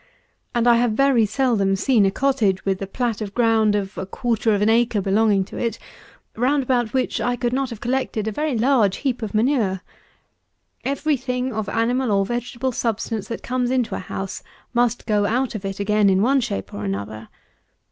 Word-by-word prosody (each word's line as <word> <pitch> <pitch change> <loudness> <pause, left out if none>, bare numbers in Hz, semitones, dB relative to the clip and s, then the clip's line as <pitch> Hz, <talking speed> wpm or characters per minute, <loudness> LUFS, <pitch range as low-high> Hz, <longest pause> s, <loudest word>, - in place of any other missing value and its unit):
And 240 0 +2
I 235 -1 +6
have 235 -2 +2
very 255 -3 +3
seldom 210 -6 +1
seen 205 +1 +3
a - - +3
cottage, 210 -5 +1
with 195 -1 -1
a 195 - -3
plat 230 +1 -2
of 205 -2 -5
ground 225 -3 +3
of 200 -1 -3
a 190 - -4
quarter 230 +1 0
of 205 - 0
an - - +3
acre 230 -1 +3
belonging 200 0 +2
to - - -10
it, 230 -2 -2 0.6
round 270 +4 +1
about 245 -3 0
which 260 -1 0
I 245 0 0
could 240 0 -2
not 270 0 0
have 230 -4 -8
collected 245 -4 -1
a - - 0
very 295 +2 -1
large 225 -5 +3
heap 255 -3 0
of 220 -1 -4
manure. 215 -6 +1 1.0
Every 280 +2 0
thing 250 0 -3
of 215 -2 -3
animal 240 +2 0
or 195 -1 +2
vegetable 240 +3 -3
substance 225 -3 -2
that 230 - -6
comes 250 0 -1
into 255 -2 0
a - - -2
house, 190 +1 -5 0.3
must 240 -1 +1
go 205 -2 +2
out 250 +4 0
of 210 -3 -6
it 195 0 -4
again, 210 0 +3
in 190 +1 +3
one 270 +3 +3
shape 95 - -4
or 100 - -5
another. 100 +3 -4
230 Hz, 200 wpm, -22 LUFS, 200-250 Hz, 1.0 s, I